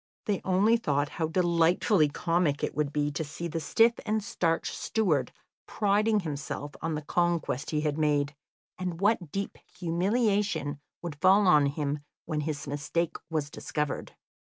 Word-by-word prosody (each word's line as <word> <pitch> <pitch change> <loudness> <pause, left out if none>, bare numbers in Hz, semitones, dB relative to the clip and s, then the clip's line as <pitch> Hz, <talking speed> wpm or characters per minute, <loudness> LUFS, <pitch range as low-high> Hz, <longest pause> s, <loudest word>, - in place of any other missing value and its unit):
They 205 -4 0
only 200 +5 +4
thought 145 -8 0
how 160 - -2
delightfully 170 0 +3
comic 165 -1 0
it - - -1
would 150 -2 -1
be 145 0 0
to 150 +2 -2
see 160 +3 -5
the 165 0 -3
stiff 225 +9 +4
and 215 0 0
starched 165 -5 -1
steward 160 - 0 0.4
priding 210 +1 +2
himself 145 -2 -5
on 165 -1 -1
the 150 - -4
conquest 170 -4 0
he 150 -1 0
had 150 0 -1
made, 145 -1 +1 0.4
and 180 -2 -3
what 195 -6 +1
deep 200 0 -4 0.2
humiliation 185 - 0 0.2
would 150 -5 -6
fall 195 +2 +6
on 150 -6 +6
him 145 0 -2 0.3
when 155 -1 -2
his 150 -1 -3
mistake 145 +4 -1
was 150 -3 -2
discovered. 150 -2 -3
165 Hz, 155 wpm, -28 LUFS, 150-190 Hz, 0.4 s, fall